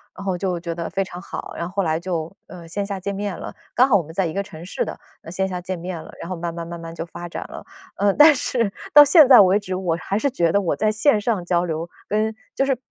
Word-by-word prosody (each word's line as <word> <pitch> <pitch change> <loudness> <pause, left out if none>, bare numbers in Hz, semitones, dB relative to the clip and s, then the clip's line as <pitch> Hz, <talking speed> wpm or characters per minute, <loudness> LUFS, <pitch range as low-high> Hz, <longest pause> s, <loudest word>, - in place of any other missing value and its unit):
然 195 - -9
后 185 -2 -1
就 180 -2 -2
觉 170 0 -5
得 170 -1 -4
非 195 - -1
常 180 -2 -6
好， - - -7
然 170 - -3
后 180 - -7
后 200 - +1
来 160 -3 0
就， 170 0 -4
呃， 175 -2 -11
线 200 +4 -3
下 200 -1 -4
见 200 +2 -4
面 200 -2 -3
了。 - - -8 0.2
刚 255 +2 +5
好 230 - +4
我 185 - +3
们 160 +1 -12
在 190 +2 0
一 160 - -3
个 200 - -1
城 170 -5 -11
市 185 - -2
的， - - -7 0.2
呃 165 - -10
线 190 +2 -1
下 180 -1 -4
见 185 0 -5
面 175 -1 -6
了。 - - -12
然 170 - -7
后 185 - -3
慢 170 0 -4
慢 170 0 -6
慢 170 0 -6
慢 165 0 -8
就 165 0 -5
发 175 0 -8
展 - - -6
了。 - - -10 0.3
呃， 200 -1 +2
但 295 0 +8
是 230 -5 -1 0.2
到 295 0 +10
现 310 +1 +7
在 255 -2 +9
为 195 0 +6
止， 185 -2 -6
我 180 -3 -1
还 200 - -1
是 280 - +1
觉 170 -11 +1
得 200 - +3
我 175 - 0
在 215 0 +1
线 215 +1 +2
上 205 -6 -1
交 175 -1 +1
流， 165 0 -3 0.2
跟 215 +1 0 0.2
就 270 - +1
是 270 -2 +1
185 Hz, 310 characters per minute, -22 LUFS, 170-205 Hz, 0.3 s, 到